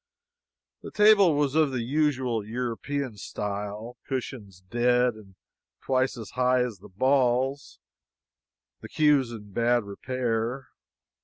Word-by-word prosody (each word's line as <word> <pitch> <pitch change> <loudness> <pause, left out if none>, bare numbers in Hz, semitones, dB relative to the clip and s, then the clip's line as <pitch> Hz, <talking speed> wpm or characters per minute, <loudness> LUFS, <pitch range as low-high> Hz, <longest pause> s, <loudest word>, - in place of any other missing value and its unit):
The - - -8
table 210 -6 +5
was 145 -2 +1
of 155 -2 +3
the 130 -3 -2
usual 130 -4 0
European 125 +2 -4
style 105 +4 -5
cushions 115 -8 -5
dead 120 +3 +2
and 100 -3 -16 0.4
twice 130 -1 0
as 110 -3 -8
high 125 0 +2
as 115 -6 -5
the 105 +3 -14
balls; 130 +5 +1 1.0
the - - -9
cues 145 -5 +3
in 105 -3 -10
bad 120 +2 +2
repair. 120 +4 -3
125 Hz, 120 wpm, -26 LUFS, 110-135 Hz, 1.0 s, table